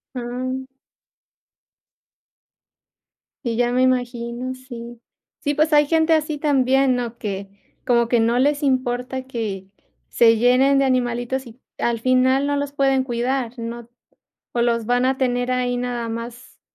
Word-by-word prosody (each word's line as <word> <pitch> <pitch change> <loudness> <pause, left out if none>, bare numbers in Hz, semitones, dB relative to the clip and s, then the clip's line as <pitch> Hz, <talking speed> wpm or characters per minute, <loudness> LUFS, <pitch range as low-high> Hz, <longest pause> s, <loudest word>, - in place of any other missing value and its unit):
Ujú. 255 +2 -4 2.8
Y 230 -1 -1
ya 245 0 +1
me 250 - +2
imagino, 245 0 -1
sí, 240 -2 -10 0.4
sí, 290 -1 -1
pues 305 +1 +1
hay 295 -1 +5
gente 320 +1 +2
así 310 -1 +1
también, 270 -2 +3
¿no?, 240 -1 -3
que 200 -3 -5 0.4
como 235 -2 +3
que 235 -1 +2
no 235 +2 +2
les 285 +3 +2
importa 255 -1 -1
que 210 -7 -4 0.4
se 230 -1 +5
llenen 255 +4 +4
de 275 - +3
animalitos 250 0 -1
y 235 +2 -13 0.2
al 235 -1 0
final 260 +3 +3
no 285 0 0
los 285 0 -3
pueden 270 -2 +2
cuidar, 245 0 -2
no, 230 0 -6 0.6
o 240 - -1
los 235 -1 +1
van 245 +2 +2
a 265 0 +1
tener 245 -1 0
ahí 250 -1 0
nada 245 -2 -3
más 230 +1 -8
250 Hz, 145 wpm, -21 LUFS, 235-265 Hz, 2.8 s, hay